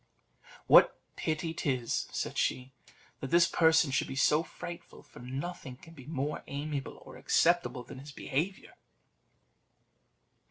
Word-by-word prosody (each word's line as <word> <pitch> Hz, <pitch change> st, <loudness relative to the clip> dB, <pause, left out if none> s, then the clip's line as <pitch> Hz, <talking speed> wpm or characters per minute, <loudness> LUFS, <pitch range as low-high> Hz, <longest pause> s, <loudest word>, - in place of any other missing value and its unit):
"What -, -, +6 dB, 0.2 s
pity 160 Hz, +1 st, -2 dB
'tis," 130 Hz, -7 st, -1 dB
said -, -, -3 dB
she, 130 Hz, +1 st, -1 dB, 0.5 s
"that 135 Hz, -, -5 dB
this 170 Hz, +3 st, +5 dB
person 160 Hz, -3 st, +4 dB
should 130 Hz, -, 0 dB
be -, -, -6 dB
so 150 Hz, +3 st, +3 dB
frightful, 170 Hz, 0 st, -9 dB
for -, -, -15 dB
nothing 135 Hz, +2 st, -6 dB
can 165 Hz, +5 st, -15 dB
be 135 Hz, -5 st, -13 dB
more 150 Hz, -1 st, -3 dB
amiable 140 Hz, -1 st, -4 dB
or -, -, -11 dB
acceptable 170 Hz, -7 st, +2 dB
than 125 Hz, -, -10 dB
his 145 Hz, +2 st, -10 dB
behaviour!" 160 Hz, +8 st, -3 dB
150 Hz, 130 wpm, -31 LUFS, 135-165 Hz, 0.5 s, What